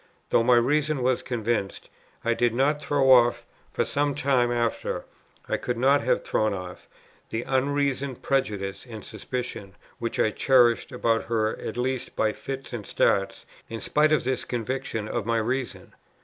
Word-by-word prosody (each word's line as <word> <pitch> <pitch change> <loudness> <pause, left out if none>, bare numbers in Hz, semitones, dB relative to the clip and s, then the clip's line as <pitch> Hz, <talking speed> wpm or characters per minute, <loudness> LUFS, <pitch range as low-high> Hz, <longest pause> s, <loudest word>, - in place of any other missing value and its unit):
Though - - +5
my 125 +1 +5
reason 145 +3 +2
was 130 0 +2
convinced, 115 -4 -2 0.4
I 115 - +3
did 120 0 +1
not 145 +4 +2
throw 140 -2 +3
off, 120 -2 +5 0.3
for - - 0
some 145 -1 0
time 130 -3 +2
after, 120 -1 -1 0.4
I - - 0
could 125 - -3
not 135 +3 +4
have 125 - +1
thrown 110 -2 0
off, 90 -1 -8 0.4
the 115 +1 -3
unreasoning 140 0 0
prejudice 105 -8 -2
and 110 -3 -8
suspicion, 115 -7 -6 0.2
which 115 0 -3
I 110 - +3
cherished 120 -1 +3
about 115 -1 0
her 110 -2 0
at 110 - -5
least 130 +1 -2
by 110 -1 +1
fits 135 -1 -7
and 110 -4 -5
starts, 95 -1 +1 0.2
in 115 - -5
spite 150 +5 +2
of 155 -5 +3
this 130 0 -1
conviction 120 -2 -3
of 110 - -3
my 115 0 +2
reason. 120 +3 -3
120 Hz, 165 wpm, -26 LUFS, 115-135 Hz, 0.4 s, Though